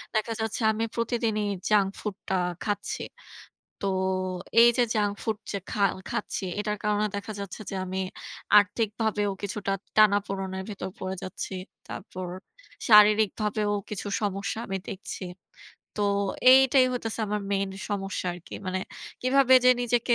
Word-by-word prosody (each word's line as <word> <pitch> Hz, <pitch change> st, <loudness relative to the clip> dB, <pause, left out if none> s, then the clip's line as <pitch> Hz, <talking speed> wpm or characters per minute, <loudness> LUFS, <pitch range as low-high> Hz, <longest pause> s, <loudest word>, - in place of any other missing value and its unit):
দেখা 220 Hz, +1 st, 0 dB
যাচ্ছে 220 Hz, +1 st, -2 dB
আমি 220 Hz, +1 st, -2 dB
প্রতিদিনই 230 Hz, -2 st, 0 dB, 0.2 s
জাঙ্ক 200 Hz, -2 st, +4 dB
ফুডটা 200 Hz, -2 st, -4 dB, 0.3 s
খাচ্ছি। 205 Hz, -2 st, -2 dB, 0.8 s
তো -, -, -2 dB, 0.8 s
এই 240 Hz, -, +9 dB
যে 245 Hz, -, +5 dB
জাঙ্ক 205 Hz, -1 st, +2 dB
ফুড 220 Hz, -2 st, -1 dB
যে 200 Hz, -, -1 dB
খা 210 Hz, -, -2 dB, 0.3 s
খাচ্ছি, 215 Hz, -3 st, -3 dB, 0.2 s
এটার 210 Hz, 0 st, -1 dB
কারণে 210 Hz, 0 st, +1 dB
দেখা 205 Hz, +2 st, -5 dB
যাচ্ছে 200 Hz, +1 st, -6 dB
যে 195 Hz, -, -4 dB
আমি 190 Hz, +1 st, -3 dB, 0.6 s
আর্থিকভাবেও 210 Hz, 0 st, +1 dB
কিছুটা 200 Hz, 0 st, -3 dB, 0.2 s
টানাপোড়নের 195 Hz, -2 st, +2 dB
ভেতর 190 Hz, -2 st, -5 dB
পড়ে 190 Hz, 0 st, -3 dB
যাচ্ছি। 185 Hz, +1 st, -5 dB, 0.3 s
তারপর 185 Hz, -1 st, -7 dB, 0.6 s
শারীরিকভাবেও 210 Hz, 0 st, +5 dB, 0.2 s
কিছু 205 Hz, -1 st, -4 dB
সমস্যা 200 Hz, +1 st, -2 dB
আমি 195 Hz, 0 st, -2 dB
দেখছি। 195 Hz, 0 st, -6 dB, 0.8 s
তো -, -, -2 dB, 0.5 s
এইটাই 265 Hz, 0 st, +7 dB
হইতেছে 225 Hz, -2 st, -3 dB
আমার 210 Hz, 0 st, -1 dB
মেইন 195 Hz, 0 st, +1 dB, 0.2 s
সমস্যা 195 Hz, -2 st, -2 dB
আরকি। 175 Hz, -1 st, -10 dB
মানে 185 Hz, 0 st, -1 dB, 0.4 s
কিভাবে 260 Hz, 0 st, +5 dB
যে 255 Hz, -, +8 dB
নিজেকে 240 Hz, 0 st, +2 dB
210 Hz, 130 wpm, -27 LUFS, 195-220 Hz, 0.8 s, এই